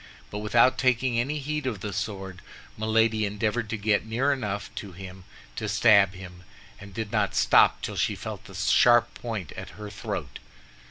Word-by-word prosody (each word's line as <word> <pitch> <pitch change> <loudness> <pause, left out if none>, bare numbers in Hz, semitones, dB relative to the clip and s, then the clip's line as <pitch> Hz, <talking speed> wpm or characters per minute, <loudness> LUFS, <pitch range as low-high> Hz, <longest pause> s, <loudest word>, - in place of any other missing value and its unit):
But 105 - -4
without 115 +4 +3
taking 125 -2 +2
any 140 +6 -1
heed 150 0 -3
of 110 -6 -3
the 105 -1 -4
sword, 95 -2 -5 0.3
Milady 110 0 +2
endeavored 105 +2 -1
to 110 - -2
get 105 0 +1
near 125 +6 +1
enough 105 -6 -4
to 100 -3 -7
him 95 0 -10 0.3
to 110 - -3
stab 100 -3 +5
him, 90 -1 -11 0.4
and 100 0 -11
did 110 +1 -5
not - - 0
stop - - +4
till - - -4
she - - +1
felt - - -7
the - - -12
sharp 120 -1 +4
point 110 -9 -5
at - - -8
her 105 -1 -8
throat. 100 - -5
110 Hz, 175 wpm, -26 LUFS, 100-120 Hz, 0.4 s, stab